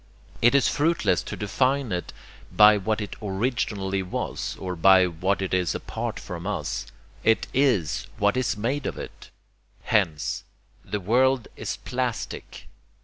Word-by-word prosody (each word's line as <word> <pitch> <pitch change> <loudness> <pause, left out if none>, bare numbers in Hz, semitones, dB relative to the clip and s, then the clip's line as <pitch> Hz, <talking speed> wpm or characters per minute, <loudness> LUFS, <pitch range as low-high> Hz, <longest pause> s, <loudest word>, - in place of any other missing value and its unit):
It 120 +3 +5
is 140 - +5
fruitless 165 +3 +2
to - - -6
define 130 +4 0
it 90 -1 -3 0.4
by 105 0 +7
what 105 +2 -1
it 105 - -5
originally 100 -2 -1
was 90 -1 -4
or 90 -1 -4
by 95 +2 +6
what 90 +3 -1
it 95 - -3
is 90 -2 +1
apart - - -4
from 85 +1 -7
us; 85 -11 -3 0.4
it 115 0 +3
IS 125 - +1
what 105 +2 +2
is 130 -4 0
made 130 +7 -1
of - - -4
it. - - -9 0.5
Hence... 90 -9 0 0.4
the 105 - -3
world 125 +5 +2
is - - -4
PLASTIC." 125 -2 -4
105 Hz, 145 wpm, -25 LUFS, 95-125 Hz, 0.5 s, by